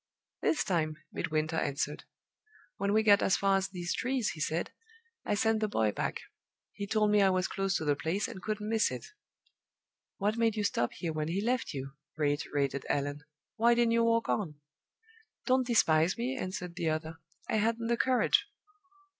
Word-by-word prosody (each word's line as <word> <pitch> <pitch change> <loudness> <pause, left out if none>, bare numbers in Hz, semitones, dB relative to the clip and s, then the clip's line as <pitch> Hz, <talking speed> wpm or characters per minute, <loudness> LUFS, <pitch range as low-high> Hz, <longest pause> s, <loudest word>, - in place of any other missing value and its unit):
This 315 - +2
time 155 -4 0 0.2
Midwinter 155 +1 -1
answered. 145 0 -2 0.7
"When 200 - 0
we 220 +1 +3
got 205 -1 +6
as 190 - +3
far 195 -1 +3
as 190 0 -1
these 180 -2 -3
trees," 255 -3 0
he 155 - -10
said, 160 +2 -1 0.5
"I 210 - +1
sent 220 +1 +2
the 215 - +1
boy 110 - +1
back. - - -3 0.5
He 200 -1 -5
told 210 0 +2
me 210 -1 +5
I 195 - +5
was 185 0 +1
close 195 -1 -1
to 160 - -1
the 145 -1 +2
place, 165 +8 -1
and 190 - -8
couldn't 210 +1 -3
miss 220 0 +2
it." - - -6 1.1
"What 210 +2 0
made 225 -2 +2
you 210 - -1
stop 120 -11 0
here 165 -2 -4
when 155 -1 -2
he 175 +4 -1
left 235 - -1
you?" 135 0 -5 0.3
reiterated 145 -2 0
Allan. 145 +1 -1 0.4
"Why 235 +2 +5
didn't 235 -1 +3
you 230 0 +3
walk 230 0 +2
on?" 175 -8 -1 0.9
"Don't 255 -1 +2
despise 165 -6 +3
me," 250 +3 -2
answered 185 -6 -5
the 165 - 0
other. 160 +1 -3 0.3
"I - - +1
hadn't 230 +2 0
the 235 +1 +2
courage!" 255 +1 +3
195 Hz, 180 wpm, -31 LUFS, 155-225 Hz, 1.1 s, got